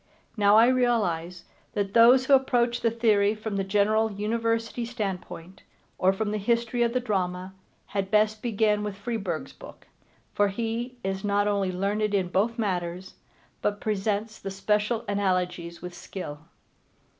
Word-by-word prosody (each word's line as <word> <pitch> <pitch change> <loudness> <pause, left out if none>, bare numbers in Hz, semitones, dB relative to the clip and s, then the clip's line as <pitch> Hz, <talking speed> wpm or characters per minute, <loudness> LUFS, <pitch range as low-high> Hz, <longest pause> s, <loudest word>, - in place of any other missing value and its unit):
Now 205 -1 +5
I 230 +2 +7
realize 210 -9 0 0.3
that 200 -1 -2
those 245 +3 +7
who 280 - +3
approach 245 -3 +3
the 230 - +3
theory 215 -3 +2
from 215 -1 -5
the 195 - 0
general 210 +3 +2
University 230 +3 -1
standpoint, 195 -6 -5 0.4
or 185 - +4
from 205 +2 -2
the 215 - -1
history 235 +3 0
of 235 0 +2
the 255 - +2
drama, 185 -5 -2 0.3
had 195 -1 -3
best 215 +1 +2
begin 215 -2 +1
with 205 -2 -4
Freeburg's 200 -6 -4
book, - - -13 0.5
for 205 - +3
he 230 +4 -3
is 190 0 -3
not 205 0 +1
only 200 -2 0
learned 205 +3 0
in 185 -3 0
both 220 +6 0
matters, 180 -3 -3 0.5
but 205 0 -1
presents 215 +1 -2
the 195 - -5
special 210 +4 0
analogies 180 -4 -1
with 180 0 -6
skill. 150 -5 -8
210 Hz, 150 wpm, -26 LUFS, 195-230 Hz, 0.5 s, I